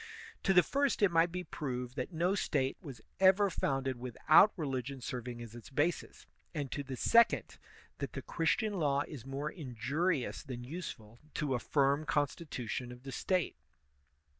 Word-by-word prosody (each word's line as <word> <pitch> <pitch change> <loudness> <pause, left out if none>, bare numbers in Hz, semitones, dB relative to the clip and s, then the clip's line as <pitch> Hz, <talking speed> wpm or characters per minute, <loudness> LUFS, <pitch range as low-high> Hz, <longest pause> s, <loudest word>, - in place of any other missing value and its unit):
To 195 - +2
the 180 -1 +7
first 280 -5 +1
it 195 - +5
might 165 +1 +4
be 180 +1 -3
proved 125 -6 -4
that 130 +5 -3
no 175 +3 +1
State 135 -9 0
was 135 - -9 0.2
ever 195 +1 +5
founded 135 -4 -1
without 130 - +5
religion 135 -3 -3
serving 120 -1 -5
as 115 -2 -10
its 120 -1 -11
basis, 145 +5 -1 0.3
and 145 -3 -3
to 145 - -2
the 135 -1 -6
second, 235 - +3 0.4
that - - -4
the - - -5
Christian 200 +5 0
law 140 -2 +2
is 135 -5 -9
more 140 +3 -3
injurious 145 - -1
than 125 -4 -7
useful 120 -7 -7 0.2
to 145 -3 0
a 125 - +1
firm 140 +3 +1
constitution 135 -5 -2
of 125 +1 -12
the 135 - -7
State. 185 +4 0
140 Hz, 165 wpm, -33 LUFS, 125-170 Hz, 0.4 s, the